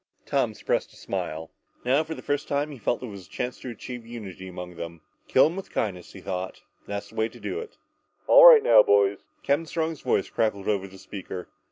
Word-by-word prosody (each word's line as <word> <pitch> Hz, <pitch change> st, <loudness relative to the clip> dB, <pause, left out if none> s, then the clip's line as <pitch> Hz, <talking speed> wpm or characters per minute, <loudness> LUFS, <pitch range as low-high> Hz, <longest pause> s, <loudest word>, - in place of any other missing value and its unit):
Tom -, -, 0 dB
suppressed -, -, -1 dB
a -, -, -18 dB
smile. 80 Hz, +1 st, -4 dB, 0.3 s
Now, 135 Hz, +5 st, +3 dB
for 160 Hz, +1 st, -6 dB
the -, -, -10 dB
first 145 Hz, 0 st, -1 dB
time, 145 Hz, +1 st, -1 dB
he 140 Hz, -, -9 dB
felt 120 Hz, +2 st, -1 dB
that -, -, -5 dB
there 115 Hz, -, -7 dB
was 100 Hz, -2 st, -10 dB
a -, -, -30 dB
chance 125 Hz, 0 st, -4 dB
to 130 Hz, -, -7 dB
achieve 120 Hz, +1 st, -7 dB
unity 105 Hz, -5 st, -8 dB
among 90 Hz, -1 st, -8 dB
them. 85 Hz, -1 st, -7 dB, 0.3 s
Kill -, -, +6 dB
him 160 Hz, +3 st, -1 dB
with 195 Hz, -, -7 dB
kindness, 90 Hz, -5 st, -3 dB
he 95 Hz, -, -10 dB
thought, 95 Hz, -1 st, -4 dB, 0.3 s
that's 100 Hz, 0 st, -5 dB
the -, -, -16 dB
way 110 Hz, +1 st, +1 dB
to -, -, -14 dB
do 425 Hz, -, -3 dB
it. 455 Hz, -1 st, -9 dB, 0.5 s
"All -, -, +9 dB
right, 480 Hz, -3 st, +10 dB, 0.2 s
boys!" 430 Hz, -3 st, +3 dB, 0.2 s
Captain 145 Hz, +4 st, +1 dB
Strong's 160 Hz, -2 st, -2 dB
voice 130 Hz, -, +1 dB
crackled 100 Hz, -3 st, -1 dB
over 100 Hz, -2 st, 0 dB
the 95 Hz, 0 st, -14 dB
speaker. 95 Hz, -2 st, -7 dB
115 Hz, 220 wpm, -26 LUFS, 95-155 Hz, 0.5 s, right